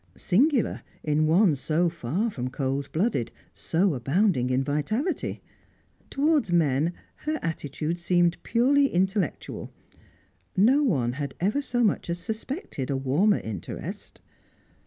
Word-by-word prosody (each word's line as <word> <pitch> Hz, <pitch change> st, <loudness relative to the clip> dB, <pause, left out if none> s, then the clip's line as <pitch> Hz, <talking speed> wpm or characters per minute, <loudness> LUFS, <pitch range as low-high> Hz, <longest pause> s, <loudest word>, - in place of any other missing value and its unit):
Singular 255 Hz, -, +2 dB, 0.2 s
in 155 Hz, 0 st, +2 dB
one 170 Hz, 0 st, +4 dB
so 160 Hz, +5 st, +1 dB
far 170 Hz, -, -2 dB
from 125 Hz, -7 st, -4 dB
cold 135 Hz, +1 st, -2 dB
blooded, 175 Hz, -, 0 dB, 0.2 s
so 175 Hz, +2 st, +1 dB
abounding 135 Hz, -, +1 dB
in 130 Hz, +1 st, +1 dB
vitality. 185 Hz, -, -2 dB, 0.7 s
Towards 290 Hz, -, +1 dB
men, 160 Hz, -1 st, +2 dB, 0.2 s
her 310 Hz, +1 st, -2 dB
attitude 160 Hz, +1 st, -3 dB
seemed 175 Hz, 0 st, +2 dB
purely 275 Hz, +4 st, +3 dB
intellectual; 190 Hz, -, -1 dB, 0.9 s
no 250 Hz, +10 st, +5 dB
one 135 Hz, -, +1 dB
had 140 Hz, 0 st, -5 dB
ever 210 Hz, +10 st, +1 dB
so 245 Hz, -3 st, 0 dB
much 205 Hz, -4 st, +1 dB
as 170 Hz, -, -1 dB
suspected 220 Hz, -, -5 dB
a 135 Hz, -, 0 dB
warmer 150 Hz, +11 st, +2 dB
interest. 105 Hz, -6 st, -7 dB
175 Hz, 120 wpm, -26 LUFS, 140-220 Hz, 0.9 s, no